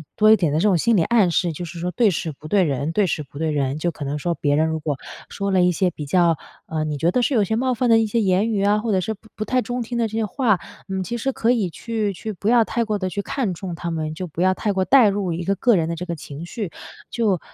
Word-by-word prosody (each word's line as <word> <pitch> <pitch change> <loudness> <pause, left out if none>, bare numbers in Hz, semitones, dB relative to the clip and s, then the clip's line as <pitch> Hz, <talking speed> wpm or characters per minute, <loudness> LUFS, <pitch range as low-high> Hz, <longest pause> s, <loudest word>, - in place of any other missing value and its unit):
多 215 0 +5
一 - - +9
点 170 -8 0
的 150 - +1
这 - - 0
种 195 - +4
心 230 +7 +3
理 170 - +4
暗 215 -2 +3
示， 170 0 0
就 165 - -6
是 170 0 -7
说 180 +2 -2
对 230 +2 +3
事 165 -3 -2
不 150 +1 -11
对 195 +3 +3
人 140 -1 -1
对 205 +4 +2
事 160 - -1
不 140 -1 -12
对 160 +1 -1
人， 140 -1 -1
就 175 +2 -1
可 155 - -8
能 140 +1 -2
说 170 +4 -1
别 145 -3 0
人 155 +2 +2
如 160 0 -2
果 150 -2 -2 0.3
说 200 0 -3
了 190 -1 +3
一 180 0 +4
些 180 +1 +1
比 150 -3 -7
较， 170 +1 +3 0.3
呃， 155 -1 -2
你 150 -1 -2
觉 165 +4 +2
得 250 - +1
是 260 +3 +1
有 215 - +4
些 220 +3 -1
冒 255 +2 0
犯 245 +2 0
的 225 -1 +6
一 225 - +1
些 230 +3 0
言 195 +1 +2
语 200 -3 0
啊， 205 +1 +3
或 225 +1 -2
者 190 - +2
是 220 +4 -2
不 220 +1 -18
不 215 - -3
太 255 +4 +1
中 245 0 -3
听 240 +2 -6
的 230 - +2
这 220 +1 -5
些 225 - +1
话， 215 -3 +1 0.3
你 190 -1 -2
其 240 +6 -4
实 270 +4 0
可 235 -2 +1
以 220 -7 +1
去 215 +2 -3
去 215 +4 -6
不 200 +2 -5
要 235 0 +5
太 235 - -1
过 215 -2 -1
的 185 -2 -2
去 200 - -2
看 255 -4 -2
重 175 0 -6
它 170 0 -4
们， 155 -1 -3
就 185 - -4
不 165 0 -5
要 185 +1 +3
太 210 0 -1
过 190 -1 +1
带 220 +4 +6
入 195 -3 -1
一 170 +2 -3
个 195 - +1
个 235 +4 +3
人 165 -3 +1
的 170 - -2
这 180 +2 -6
个 170 - -3
情 150 0 -9
绪。 205 -4 -5 0.4
就 210 -6 +1
190 Hz, 335 characters per minute, -22 LUFS, 165-220 Hz, 0.4 s, 一